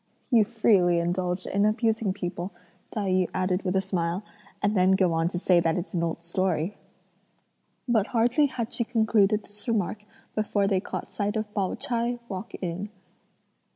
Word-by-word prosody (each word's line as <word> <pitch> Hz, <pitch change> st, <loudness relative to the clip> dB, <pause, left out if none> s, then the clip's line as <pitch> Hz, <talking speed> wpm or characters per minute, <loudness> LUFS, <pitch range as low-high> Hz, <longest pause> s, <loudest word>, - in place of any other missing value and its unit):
"You 230 Hz, -3 st, +6 dB
freely 200 Hz, -6 st, +3 dB
indulge 180 Hz, +1 st, -1 dB
in 200 Hz, +1 st, +1 dB
abusing 220 Hz, -1 st, +2 dB
people," 180 Hz, -1 st, -4 dB, 0.4 s
Tai 205 Hz, -3 st, -2 dB
yü 185 Hz, -1 st, +2 dB
added 185 Hz, 0 st, +1 dB
with 185 Hz, -1 st, -1 dB
a 190 Hz, -, +3 dB
smile, 180 Hz, 0 st, -1 dB, 0.4 s
"and 205 Hz, +1 st, +1 dB
then 185 Hz, 0 st, +5 dB
go 185 Hz, -3 st, +3 dB
on 165 Hz, 0 st, +2 dB
to 175 Hz, -, -3 dB
say 180 Hz, -1 st, +4 dB
that 165 Hz, 0 st, +1 dB
it's 180 Hz, -, -5 dB
an 170 Hz, -, 0 dB
old 170 Hz, 0 st, -2 dB
story." 180 Hz, +1 st, -1 dB, 1.1 s
But 220 Hz, -4 st, +2 dB
hardly 245 Hz, +5 st, +3 dB
had 235 Hz, -4 st, -4 dB
she 235 Hz, -, +1 dB
concluded 220 Hz, -2 st, +2 dB
this 205 Hz, +2 st, -13 dB
remark 210 Hz, -2 st, 0 dB, 0.3 s
before 210 Hz, -1 st, +1 dB
they 195 Hz, -1 st, +2 dB
caught -, -, -6 dB
sight 205 Hz, +1 st, -1 dB
of 215 Hz, -1 st, -3 dB
Pao 195 Hz, -3 st, 0 dB
ch'ai 240 Hz, 0 st, -1 dB
walk 190 Hz, +1 st, -6 dB
in. 185 Hz, +3 st, -4 dB
195 Hz, 170 wpm, -27 LUFS, 180-220 Hz, 1.1 s, You